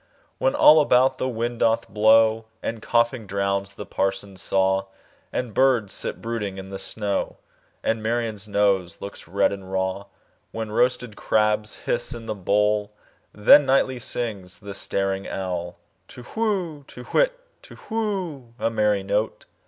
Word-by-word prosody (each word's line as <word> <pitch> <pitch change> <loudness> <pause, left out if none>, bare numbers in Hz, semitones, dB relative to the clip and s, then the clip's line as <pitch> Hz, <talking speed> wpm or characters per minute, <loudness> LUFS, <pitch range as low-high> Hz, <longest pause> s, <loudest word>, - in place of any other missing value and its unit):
When - - +1
all 155 +1 +8
about 130 -1 +3
the 130 - -1
wind 120 0 -3
doth 115 0 +2
blow, 110 +1 +4 0.2
And 115 -1 -4
coughing 120 -1 +1
drowns 100 0 -1
the 105 - -8
parson's 95 0 -2
saw, 95 0 +1 0.5
And 125 -4 -3
birds 125 -6 +2
sit - - -2
brooding 110 -4 -3
in 95 0 -8
the 95 - -5
snow, 100 0 -2 0.5
And 115 -1 0
Marian's 110 -2 -2
nose 100 -4 +1
looks 100 -4 -8
red 100 +3 +2
and 95 -1 -7
raw; 95 +1 -2 0.5
When 110 -1 -5
roasted 125 -1 +1
crabs 105 0 +1
hiss - - +1
in 115 -1 -9
the 110 - -2
bowl—Then 105 +5 +2
nightly 130 -1 +2
sings 105 -6 -3
the 100 -1 -9
staring 95 0 -1
owlTu 90 +6 -7
whoo! 190 -10 -1
To 125 - -11
whit, - - +1 0.2
Tu - - -14
whoo! 185 - -3
A 115 - -1
merry 105 -3 +1
note! 105 +3 -1
105 Hz, 145 wpm, -24 LUFS, 100-120 Hz, 0.5 s, all